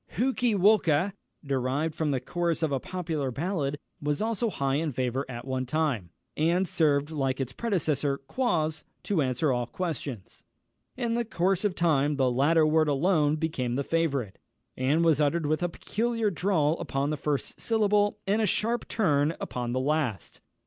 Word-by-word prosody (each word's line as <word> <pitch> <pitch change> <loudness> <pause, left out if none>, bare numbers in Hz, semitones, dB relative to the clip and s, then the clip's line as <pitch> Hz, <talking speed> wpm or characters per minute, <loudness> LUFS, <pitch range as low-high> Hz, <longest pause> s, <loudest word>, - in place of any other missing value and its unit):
Hookey 250 -2 +1
Walker, 190 -3 +3 0.3
derived 140 +3 -1
from 155 -1 -1
the 135 -2 +1
chorus 170 +4 -1
of 155 - +1
a 135 - +1
popular 160 -4 -3
ballad, 145 0 -2 0.2
was 145 0 -1
also 225 +1 0
high 140 -7 0
in 155 0 -1
favour 130 +2 -2
at 120 -1 -6
one 130 -1 -2
time, 135 - -1 0.3
and 170 +4 +2
served, 145 -2 +2
like 135 -3 -1
its 130 -1 -3
predecessor 155 - 0
Quoz, 160 - -1 0.2
to 195 -6 +1
answer 130 +2 +1
all 120 -1 -1
questions. 140 - -5 0.6
In 235 -2 -1
the 240 0 +1
course 190 -3 0
of 205 -3 0
time, 150 -4 +2
the 130 -2 +2
latter 155 +6 +4
word 155 0 +3
alone 150 0 +2
became 150 -7 -2
the 140 - 0
favourite, 140 -10 -1 0.4
and 145 +6 +2
was 155 -2 +4
uttered 150 +2 +1
with 155 +2 0
a 175 - 0
peculiar 225 +4 -1
drawl 165 -3 +1
upon 140 +2 -1
the - - 0
first 145 -1 -3
syllable, 210 -2 +2
and 205 +3 +2
a 215 - +2
sharp 235 +4 0
turn 155 -7 +1
upon 120 -1 -3
the 130 - 0
last. 135 - -2
155 Hz, 170 wpm, -28 LUFS, 135-180 Hz, 0.6 s, latter